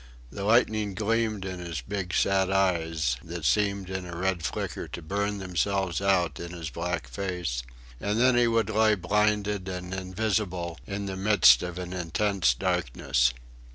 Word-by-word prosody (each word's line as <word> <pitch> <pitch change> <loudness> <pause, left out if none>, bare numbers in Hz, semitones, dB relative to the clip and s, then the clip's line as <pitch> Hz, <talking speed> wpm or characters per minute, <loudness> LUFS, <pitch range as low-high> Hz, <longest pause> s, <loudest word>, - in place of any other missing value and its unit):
The 100 - -6
lightning 110 -2 +2
gleamed 110 -1 0
in 95 -1 -5
his 85 -6 -4
big 95 +5 -4
sad 95 -1 +2
eyes 80 -8 +1
that 85 -1 -6
seemed 100 +7 +1
in 95 0 -3
a 85 -1 -7
red 90 -2 -1
flicker - - -3
to - - -7
burn 100 +5 -1
themselves 95 0 -1
out 95 -3 +2
in 85 +1 -6
his 85 -3 -6
black 85 -5 -3
face, 85 -2 -3 0.4
and 105 +2 -1
then 125 +1 +5
he 120 -1 +4
would 115 -2 +1
lie 110 0 +4
blinded 105 +1 0
and 90 -1 -5
invisible 95 -2 -2
in 100 0 -4
the 95 -1 -4
midst 95 - +6
of 90 0 -5
an 90 0 -5
intense 90 -4 +1
darkness. - - +1
95 Hz, 160 wpm, -27 LUFS, 85-105 Hz, 0.4 s, midst